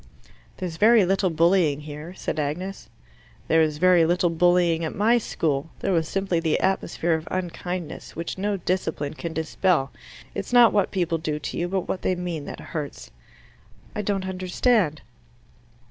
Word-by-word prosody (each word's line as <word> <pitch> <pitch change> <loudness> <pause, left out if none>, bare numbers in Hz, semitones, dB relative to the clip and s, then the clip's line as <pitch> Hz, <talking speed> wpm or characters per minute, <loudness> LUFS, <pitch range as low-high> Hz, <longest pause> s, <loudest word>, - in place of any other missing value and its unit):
"There's 175 -3 -5
very 220 +1 +6
little 190 +1 +2
bullying 165 -3 +3
here," 150 +4 -8
said 155 - -3
Agnes. 165 +3 -4 0.6
"There 160 0 +4
was 155 -1 +1
very 180 0 +5
little 175 +1 +2
bullying 175 -1 +3
at 160 - -3
my 230 +4 +3
school. 150 -8 -2
There 195 - 0
was 165 -2 +1
simply 195 -2 0
the 160 -2 +1
atmosphere 175 -3 0
of 160 0 -2
unkindness, 180 -1 -5
which 165 +1 -4
no 200 +1 -1
discipline 165 -5 -2
can 165 +1 -5
dispel. 160 -2 0 0.4
It's - - -5
not 240 -2 +7
what 200 -2 +2
people 170 -4 -1
do 155 -2 -2
to 150 - -5
you, 175 - -1
but 190 0 -2
what 185 - -3
they 185 - +1
mean, 175 -4 -4
that - - -7
hurts." 150 -4 -5 0.8
"I 210 - -1
don't 195 -2 -1
understand." 185 - +1
175 Hz, 160 wpm, -24 LUFS, 160-190 Hz, 0.8 s, not